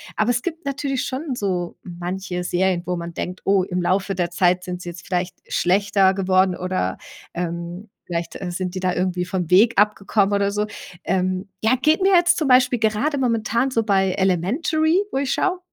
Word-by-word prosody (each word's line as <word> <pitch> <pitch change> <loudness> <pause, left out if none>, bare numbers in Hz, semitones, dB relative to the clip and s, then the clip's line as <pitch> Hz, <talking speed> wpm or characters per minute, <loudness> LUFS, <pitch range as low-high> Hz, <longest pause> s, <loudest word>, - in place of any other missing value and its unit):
Aber 215 +3 +2
es 240 0 0
gibt 330 0 -5
natürlich 275 -1 -2
schon 265 0 -4
so 180 -5 -2
manche 180 +1 -5
Serien, 180 0 +1
wo 180 - 0
man 170 0 -6
denkt: 180 +2 -5
„Oh, 195 -1 +4
im 180 -1 -2
Laufe 195 +2 0
der 175 -1 -1
Zeit 180 +1 +2
sind 180 -1 -5
sie 175 - -6
jetzt 175 0 -10
vielleicht 180 0 -2
schlechter 195 +1 +2
geworden“, 185 -1 +2
oder, 180 - -2 0.4
ähm, 170 +3 -5 0.2
vielleicht, 170 -1 -4
äh, 180 - -3
sind 180 +1 -3
die 185 - -4
da 185 0 0
irgendwie 180 0 -1
vom 180 -2 -3
Weg 220 +6 +5
abgekommen 205 -1 +2
oder 200 0 +2
so. 210 +1 -1 0.4
Ähm, 185 +1 -1 0.2
ja, 225 +3 +4
geht 310 +6 +3
mir 385 +1 +4
jetzt 350 0 +4
zum 305 - 0
Beispiel 250 -1 +4
gerade 225 +7 0
momentan 235 0 +1
so 230 -4 0
bei 195 -3 +2
„Elementary“, 295 - +1
wo - - -2
ich 275 -1 -1
schaue. 370 -1 0
195 Hz, 190 wpm, -22 LUFS, 180-240 Hz, 0.4 s, Weg